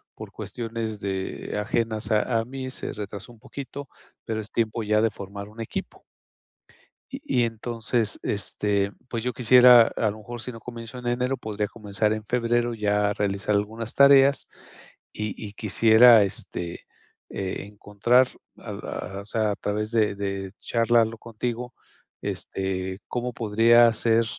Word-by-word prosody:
Por - - -9
cuestiones 115 -2 -5
de 95 +1 -4
ajenas 110 -1 -1
a 115 +2 +2
a 115 - -2
mí, 130 +1 -6
se - - -5
retrasó 100 +1 -7
un 115 - -20
poquito. 140 +2 -8 0.4
Pero 110 -1 -2
es 110 - -9
tiempo 115 0 -1
ya, 105 0 +2
de 115 - +3
formar 100 0 -8
un 110 +2 -9
equipo. 115 - -6 1.1
Y 125 -2 -1
y - - +4
entonces, 115 0 -2
este, 100 -1 0 0.2
pues 115 -2 -3
yo 125 0 -1
quisiera, 125 -1 +8
a 110 - +1
lo 105 - -10
mejor, 120 +2 -8
si 125 - -5
no 115 - -10
comienzo 115 +1 -8
en 120 - -6
enero, 125 +2 0
podría 105 -3 -3
comenzar 105 0 -1
en 110 - -4
febrero, 120 +1 0
ya 105 -1 +1
a - - -1
realizar 100 0 -1
algunas 110 +2 -2
tareas. 140 0 +6 0.7
Y 105 0 -3
y 105 -1 -7
quisiera, 110 +2 +6
este, 90 -3 -4 0.4
eh, 95 0 -4
encontrar, 105 +5 +2 0.3
al - - -8
a 95 +2 -5
O 100 - -13
sea, 110 -1 0
a 100 - -2
través 105 +2 -2
de 110 -3 +2
de 100 -1 -4
Charlarlo 115 -1 +2
contigo, 120 +2 -5 0.5
este, 95 0 -3
cómo 125 0 -3
podría 115 +2 +5
ser, 115 +1 +2
110 Hz, 155 wpm, -25 LUFS, 105-120 Hz, 1.1 s, quisiera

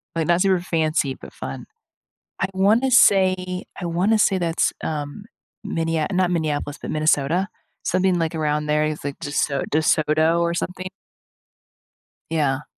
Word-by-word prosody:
like, 165 -2 -1
not 175 +1 +3
super 190 -2 +3
fancy, 155 -5 0
but - - -13
fun. 65 0 -7 0.8
I 190 - +2
wanna 215 +7 +3
say 185 -5 +3 0.2
I 175 - -3
wanna 185 +6 +1
say 195 -2 +3
that's, 170 -2 0
um, 150 +6 -4 0.4
Minneap 165 -2 -1
not 180 -1 +2
Minneapolis, 150 -3 -2
but - - -5
Minnesota. 155 +4 +1 0.4
Something 185 0 +1
like 165 0 -1
around 150 -1 -1
there. 150 0 +2
It's 155 0 -3
like 140 -1 -4
DeSo 145 -1 -1
DeSoto, 155 +2 +2
or 170 0 +1
something. 185 +1 -4 1.4
Yeah. 150 -3 0
165 Hz, 140 wpm, -22 LUFS, 150-185 Hz, 1.4 s, not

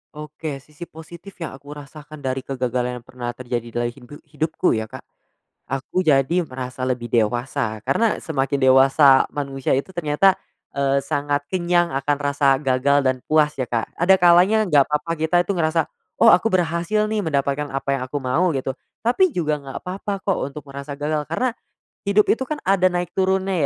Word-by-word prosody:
Oke. 150 -2 -7
Sisi 150 +4 -11
positif 170 +4 -12
yang - - -5
aku 145 +2 -11
rasakan 145 +1 -11
dari 130 0 -1
kegagalan 125 -2 -3
yang - - -34
pernah 125 -1 -6
terjadi 120 -2 -4
dalam 120 - 0
hidu 125 +3 -14
hidupku 160 +3 -1
ya 110 -1 -1
Kak, - - -10 0.7
aku 135 +7 -2
jadi 155 +3 +3
merasa 130 -3 -6
lebih 125 -2 -2
dewasa. 115 -1 -1
Karena 215 +12 +1
semakin 140 -2 -1
dewasa 135 +1 +6
manusia 135 -2 -3
itu 140 +8 -1
ternyata, 175 +4 +3 0.4
eee, 140 0 +2
sangat 145 +1 -2
kenyang 175 -2 +1
akan 145 +1 0
rasa 140 -1 +2
gagal 135 +1 +2
dan 130 -1 -1
puas 150 -1 +2
ya, 130 - -2
Kak. 115 -1 -1
Ada 185 +3 +4
kalanya 180 +5 +5
nggak 145 -5 +5
papa 150 +3 -1
kita 160 +2 -1
itu 200 - -1
ngerasa, 165 -1 +1 0.3
"Oh, - - +6
aku 225 - +3
berhasil 175 +4 +1
nih 215 -1 -1
mendapatkan 145 -2 -1
apa 135 0 -1
yang 135 - -4
aku 145 - -4
mau." 140 +8 +1
Gitu. 135 -2 -3 0.2
Tapi 330 - +2
juga 155 - 0
nggak 135 -1 -7
papa 195 +2 -4
kok, 195 0 0
untuk 140 +2 -7
merasa 140 +1 -8
gagal, 150 0 -1
karena 250 -2 0 0.5
hidup 205 +1 +4
itu 260 +2 -3
kan 305 - -2
ada 185 -1 +3
naik 175 -1 -3
turunnya 190 0 0
145 Hz, 175 wpm, -21 LUFS, 135-175 Hz, 0.7 s, dewasa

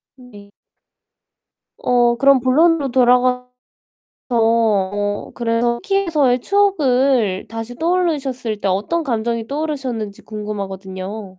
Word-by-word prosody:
네. 225 -6 -15 1.3
어 240 -1 +2
그럼 275 +1 +4
본론으로 290 +3 +2
돌아가서 250 0 +2 0.8
어 205 -3 +1
그래서 235 0 0
터키에서의 330 - +1
추억을 265 - +1
다시 225 +1 -6
떠올리셨을 280 - -1
때 200 - -1
어떤 205 - -1
감정이 230 -4 -2
떠오르셨는지 270 -8 -4
궁금하거든요. 195 -2 -7
240 Hz, 260 characters per minute, -19 LUFS, 215-275 Hz, 1.3 s, 그럼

